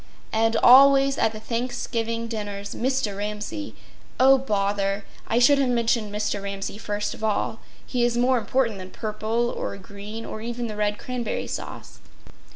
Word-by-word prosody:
And 225 +1 +2
always 275 +1 +7
at - - +3
the 215 - -8
Thanksgiving 230 0 -2
dinners 205 -3 -5
Mr. 255 -5 -1
Ramsay— 210 +8 -5 0.4
Oh, 265 +1 +7
bother! 200 -4 -1 0.2
I 230 - +1
should 275 +4 +6
have 270 -2 +2
mentioned 230 -3 +1
Mr. 210 -1 -2
Ramsay 200 +1 -5
first 210 -1 -2
of - - -11
all. 220 +1 0 0.3
He 245 -2 -1
is 240 0 +1
more 250 +1 +3
important 230 -1 0
than 185 0 -8
purple 220 +3 -2
or - - -4
green, 205 +3 -8
or 215 - -6
even 240 +1 -4
the 215 -2 -5
red 210 0 0
cranberry 250 -3 -3
sauce. - - -7
225 Hz, 160 wpm, -24 LUFS, 210-245 Hz, 0.4 s, always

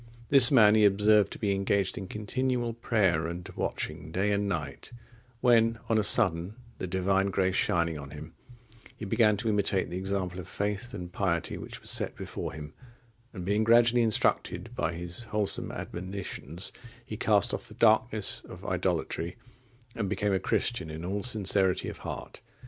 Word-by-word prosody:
This 135 -3 +8
man 110 -7 +6
he 110 -1 +4
observed 105 0 +4
to - - -8
be 105 -3 -1
engaged 100 0 0
in 95 - -6
continual 120 +4 -2
prayer 95 -8 +1
and 85 +1 -6
watching 80 - -4
day 95 +4 0
and 100 0 0
night; 75 -6 -5 0.5
when 115 -2 +4
on 110 -1 +3
a - - +1
sudden 90 -1 +3 0.2
the - - -3
Divine 95 +2 +1
grace 95 -1 0
shining 85 -4 +1
on 70 -1 -9
him, 75 +2 -10 0.6
he 110 - -6
began 105 +1 +3
to 115 - -4
imitate 100 -4 +1
the 90 - -3
example 95 -2 -3
of 90 - -8
faith 105 +4 -3
and 90 0 -7
piety 85 -4 -1
which - - -8
was - - 0
set - - 0
before - - -6
him, 75 -1 -9 0.6
and 90 -5 -7
being 105 +3 +1
gradually 120 +1 +5
instructed 110 -2 0
by 85 - -1
his 90 +7 -4
wholesome 105 -3 -1
admonitions, 90 -2 -5 0.3
he - - -6
cast - - +2
off - - -4
the - - -13
darkness 110 -1 +2
of - - -11
idolatry, 85 +2 -2 0.6
and 105 -4 -3
became 105 0 0
a 95 - +2
Christian 105 -7 -1
in 80 +2 -7
all 100 +3 -2
sincerity 100 -4 +1
of - - -9
heart. - - -7
100 Hz, 170 wpm, -28 LUFS, 90-110 Hz, 0.6 s, This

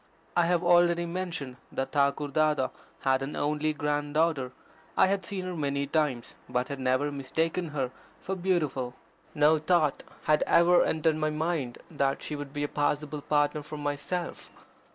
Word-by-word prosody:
I 175 -1 +4
have 175 0 +2
already 175 0 +4
mentioned 170 -7 -4
that 135 - -3
Thakur 145 0 +1
Dada 150 -2 +2 0.3
had 130 0 +2
an 135 +2 -4
only 150 +1 0
grand 145 0 -2
daughter. 155 -6 +2 0.5
I - - +7
had 190 -1 0
seen 190 -2 -4
her 180 -1 -4
many 140 -2 -1
times, 140 -5 -1 0.2
but 125 0 -1
had 140 -1 -4
never 130 +3 +1
mistaken 160 +5 -1
her 135 -5 -2 0.3
for 190 - -3
beautiful. 155 -9 -1 0.4
No 150 +1 +5
thought 155 -2 +2 0.2
had 155 0 +3
ever 175 +1 +6
entered 160 0 +1
my 155 0 +1
mind 155 -5 -2
that 140 -3 0
she 150 - -3
would 145 -1 -6
be 145 0 -3
a - - 0
possible 145 0 -1
partner 145 +1 +1
for 150 +1 -8
myself. 145 +5 -3
150 Hz, 165 wpm, -28 LUFS, 140-170 Hz, 0.5 s, I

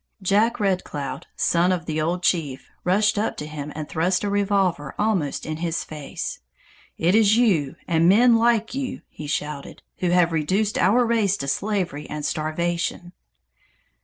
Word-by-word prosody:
Jack 215 +6 +2
Red 195 -3 +1
Cloud, 145 -2 -6
son 175 +2 +2
of 175 -2 -1
the 155 -1 -2
old 175 +3 -1
chief 145 -8 -1
rushed 205 +3 +2
up 215 - -1
to 150 - -5
him 150 -1 -6
and 155 -1 -5
thrust 180 +4 0
a 205 - -1
revolver 195 -7 0
almost 195 -10 0
in 155 0 -4
his 170 0 -2
face. 150 -3 -6 0.6
"It 170 +3 +2
is 215 0 +5
you 170 - +2
and 165 0 +3
men 235 +4 +6
like 230 -1 +2
you," 265 -1 -4
he 150 - -9
shouted, 150 -1 -4
"who 180 - 0
have 175 -1 +3
reduced 190 +7 0
our 230 +7 +4
race 220 -4 +1
to 140 - -5
slavery 170 -1 -2
and 150 -1 -4
starvation!" 170 +3 -2
180 Hz, 160 wpm, -23 LUFS, 155-205 Hz, 0.6 s, men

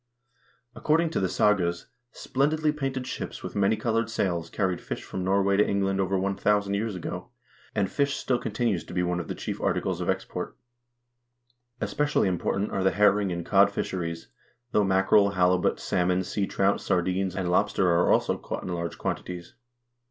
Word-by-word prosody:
According 160 +4 +1
to - - 0
the 95 - 0
sagas, 90 -5 +1 0.3
splendidly 150 +6 0
painted 135 -3 -3
ships - - -6
with - - -6
many 100 +2 +3
colored 115 +1 0
sails 85 -7 -1
carried 95 -2 -1
fish - - -5
from 95 - -5
Norway 100 +1 +2
to 105 - +6
England 95 -1 +1
over 95 0 0
1000 100 +1 +1
years 105 0 -1
ago, 90 - -6 0.5
and 100 -3 +2
fish 140 +7 0
still 125 -2 0
continues 105 -5 -1
to - - -9
be 90 - +1
one 90 0 -1
of 85 - -5
the - - -4
chief - - -5
articles - - 0
of - - -2
ex - - 0
port. - - -6 1.2
Especially 125 +5 +1
important 95 +2 -1
are 95 - -1
the 95 - +5
herring 100 -1 +3
and 85 -1 -4
cod - - +5
fisheries, 85 -6 -4 0.4
though 105 - +3
mackerel, 95 +1 +4
halibut, 90 0 +2
salmon, 90 +1 +1
seatrout, 100 +1 0
sardines, 95 0 0
and 90 -2 -1
lobster 90 +1 +2
are 85 +1 +3
also - - +2
caught - - -5
in 90 - -4
large 85 -1 -4
quantities. 90 -1 -5
95 Hz, 170 wpm, -27 LUFS, 90-105 Hz, 1.2 s, to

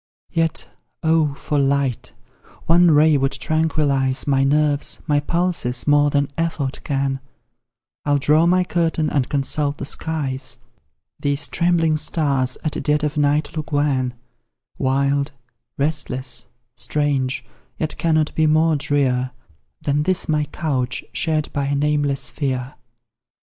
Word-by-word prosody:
Yet, 165 -2 -1 0.4
oh, 160 -3 +2
for 145 +1 -1
light! 140 -3 0 0.5
one 175 +1 +5
ray 155 0 +5
would 135 +1 0
tranquillize 145 -4 0
My 135 -1 +2
nerves, 145 +1 +1
my 145 -2 +2
pulses, 165 -6 0
more 145 0 +4
than 140 -1 0
effort 160 -5 -2
can; 135 -1 -1 0.8
I'll 145 -1 +2
draw 150 +4 +3
my 180 +1 +4
curtain 165 -3 0
and 135 -4 0
consult 145 +1 0
the - - -5
skies: 145 -3 -2 0.6
These 145 +1 -1
trembling 165 -2 +2
stars 140 -4 0
at 155 - -2
dead 150 0 +1
of 150 -1 -1
night 150 +1 +1
look 155 0 -5
wan, 135 -4 +1 0.6
Wild, 140 +2 +1 0.4
restless, 135 -3 -3 0.3
strange, 135 -2 0 0.3
yet 155 - -2
cannot 155 -2 +1
be 160 -1 +2
more 155 +1 +3
drear 135 -3 0 0.5
Than 145 +1 +1
this 185 +4 0
my 150 -1 +1
couch, 130 -6 -2
shared 155 -2 -1
by 140 -1 -1
a 140 - 0
nameless 145 -1 0
fear. 130 -2 -3
145 Hz, 130 wpm, -21 LUFS, 135-155 Hz, 0.8 s, one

